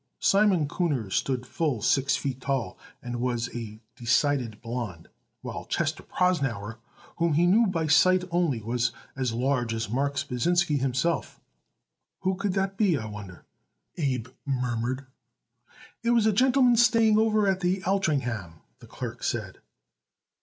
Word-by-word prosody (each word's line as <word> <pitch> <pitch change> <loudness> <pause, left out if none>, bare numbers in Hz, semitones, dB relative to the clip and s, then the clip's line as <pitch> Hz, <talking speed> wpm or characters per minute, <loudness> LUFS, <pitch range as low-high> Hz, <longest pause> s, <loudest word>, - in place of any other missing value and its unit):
Simon 195 -6 +3
Kuhner 140 - -1
stood 130 -2 0
full 150 - -1
six 135 +5 +2
feet 135 -2 -4
tall 130 -8 -2 0.3
and 120 -1 -4
was 120 -1 -2
a 110 -2 -6 0.2
decided 120 -2 +1
blond, 115 -8 -6 0.3
while - - -6
Chester - - -1
Prosnauer, 130 - -1 0.4
whom 170 -2 +1
he 165 +4 +3
knew 215 +6 +4
by 165 -4 -1
sight 185 +4 +4
only, 165 -10 0
was 120 +1 0 0.2
as 130 -3 -1
large 120 -1 0
as 110 -2 -3
Marks 140 +2 0
Pasinsky 150 +4 +1
himself. 135 +6 -1 0.8
"Who 190 0 +1
could 195 0 -2
that 195 0 -1
be, 195 -7 +3
I 110 - -5
wonder?" 105 -4 -9 0.5
Abe 130 -6 -2
murmured. 125 -1 -2 1.0
"It 235 - -1
was 235 -2 +4
a 220 - +3
gentleman 255 +1 +4
staying 225 -2 +5
over 215 -2 +3
at 190 -1 +2
the 185 +1 0
Altringham," 125 - -1 0.2
the - - -14
clerk - - -7
said. - - -3
140 Hz, 140 wpm, -27 LUFS, 120-185 Hz, 1.0 s, staying